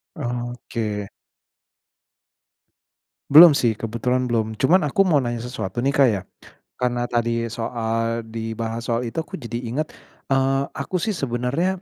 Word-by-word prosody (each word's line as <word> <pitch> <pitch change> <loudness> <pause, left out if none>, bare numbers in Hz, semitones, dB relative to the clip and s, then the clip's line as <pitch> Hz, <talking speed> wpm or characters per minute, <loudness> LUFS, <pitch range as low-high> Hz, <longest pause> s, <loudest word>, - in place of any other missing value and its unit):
Oke. 120 - -4 2.2
Belum 160 +4 +10
sih, 120 -6 +2
kebetulan 115 +4 -1
belum. 115 -3 -1
Cuman, 155 - +3
aku 195 +8 +3
mau 165 -7 +3
nanya 120 -3 -3
sesuatu 120 -2 -4
nih 135 - +2
Kak, 140 -1 +5
ya, 105 -5 0 0.6
karena 120 -1 -1
tadi 115 -1 0
soal 115 0 -2
dibahas 115 +1 -5
soal 115 0 0
itu 120 +2 -6
aku 160 - -4
jadi 120 -4 -5
inget, 140 +7 -2 0.4
eee, 135 0 +2
aku 170 +6 -3
sih 220 - -1
sebenernya, 140 +6 -1
120 Hz, 130 wpm, -22 LUFS, 115-135 Hz, 2.2 s, Belum